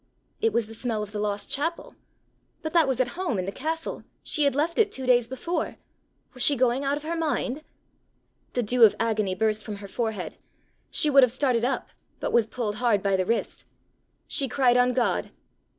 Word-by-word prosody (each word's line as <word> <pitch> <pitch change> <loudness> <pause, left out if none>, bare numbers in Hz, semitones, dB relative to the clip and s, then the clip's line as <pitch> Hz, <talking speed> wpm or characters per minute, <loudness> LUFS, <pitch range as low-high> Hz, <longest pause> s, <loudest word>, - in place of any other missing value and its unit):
It 450 +1 +3
was 235 - +1
the 220 - -11
smell 225 -2 -2
of 210 - -8
the 210 - -4
lost 205 -1 -2
chapel! 330 +4 -2 0.7
But 315 - -4
that 330 -4 +5
was 260 -2 0
at 255 -1 +2
home 340 - -2
in 185 - -2
the 195 - -3
castle! 320 +8 -4 0.2
she 300 -3 0
had 280 - +2
left 320 +6 0
it 415 -2 +4
two 265 - -5
days 245 -2 +4
before! 265 +8 -3 0.6
Was 255 - -7
she 285 +4 +5
going 255 +1 +2
out 280 +1 0
of 295 - -8
her 330 +2 -2
mind? 305 -3 -1 0.9
The 245 - 0
dew 245 +3 +3
of 220 - +7
agony 215 -4 0
burst 215 +1 0
from 210 - -5
her 200 0 -9
forehead. 220 -2 -3 0.5
She 305 -4 +1
would 275 0 +8
have 250 -3 +5
started 255 -3 +1
up, 260 +2 -1 0.3
but - - -3
was 230 -2 +4
pulled 215 -3 -3
hard 230 -5 +2
by 200 -1 +2
the 185 -1 0
wrist! 230 - -2 0.6
She 275 - -1
cried 250 -2 +3
on 250 0 +4
God. 245 -1 0
245 Hz, 205 wpm, -26 LUFS, 220-285 Hz, 0.9 s, would